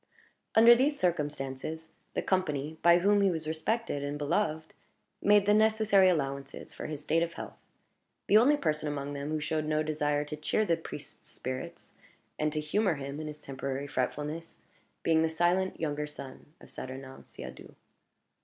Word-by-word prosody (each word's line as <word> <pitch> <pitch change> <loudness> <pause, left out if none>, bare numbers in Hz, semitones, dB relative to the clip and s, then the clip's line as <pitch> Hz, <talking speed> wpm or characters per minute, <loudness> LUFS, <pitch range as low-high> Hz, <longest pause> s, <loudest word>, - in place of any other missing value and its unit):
Under 230 +2 +9
these 275 +4 +2
circumstances, 150 -1 -2 0.3
the - - 0
company, 155 -5 0
by 170 0 +7
whom 200 +3 +3
he 195 - +4
was 160 -3 -2
respected 160 +1 -1
and 145 +1 -3
beloved, 155 +1 -1 0.5
made 205 -1 +5
the 205 - +4
necessary 215 -3 +5
allowances 140 -4 -3
for - - -6
his 150 -1 -6
state 160 +2 +2
of 170 0 -1
health; - - -8 0.7
the 205 - +3
only 260 +7 +6
person 155 - -1
among 145 -1 -3
them 140 +1 -4
who 155 0 -1
showed 155 +1 -1
no 155 0 +1
desire 150 -1 0
to 150 - -5
cheer 155 +8 0
the 170 - +3
priest's 160 -2 -9
spirits, 130 0 -6 0.5
and 155 0 +1
to 155 - -1
humor 180 +4 +1
him 140 +1 -6
in 155 - -5
his 150 0 -8
temporary 135 0 -4
fretfulness, 150 +4 -3 0.4
being 160 -1 +3
the 160 - +2
silent 175 +3 +1
younger 150 -2 -2
son 140 -3 -9
of - - -12
Saturnin 130 +1 -8
Siadoux. - - -10
155 Hz, 165 wpm, -30 LUFS, 145-185 Hz, 0.7 s, Under